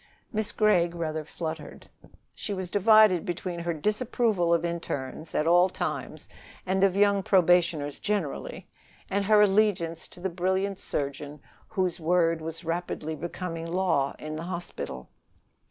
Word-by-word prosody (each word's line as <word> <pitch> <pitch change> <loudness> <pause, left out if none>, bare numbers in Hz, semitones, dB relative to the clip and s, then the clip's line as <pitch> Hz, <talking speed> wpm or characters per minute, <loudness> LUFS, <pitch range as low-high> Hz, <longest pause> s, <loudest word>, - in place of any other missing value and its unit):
Miss 215 -1 0
Gregg 175 -5 +2
rather 160 -2 -3
fluttered. 160 0 -7 0.5
She 205 - -4
was 185 -2 -5
divided 215 -3 +5
between 175 0 -4
her 170 0 -2
disapproval 210 - 0
of 170 0 +2
internes 160 -3 -4
at 150 - +1
all 175 +2 +5
times - - -4 0.4
and 190 +1 +1
of 195 -1 +3
young 200 0 +4
probationers 175 -6 +2
generally, 200 -9 -3 0.4
and 200 +1 +1
her 210 +1 +5
allegiance 195 -5 +2
to - - -14
the 185 - -1
brilliant 190 +2 -1
surgeon 145 +1 -4 0.3
whose 185 -5 -1
word 165 0 +2
was 165 +2 -6
rapidly 165 -2 -3
becoming 165 +1 -5
law 170 -6 +1
in 155 0 -6
the - - -5
hospital. 175 - -5
175 Hz, 140 wpm, -27 LUFS, 165-195 Hz, 0.5 s, divided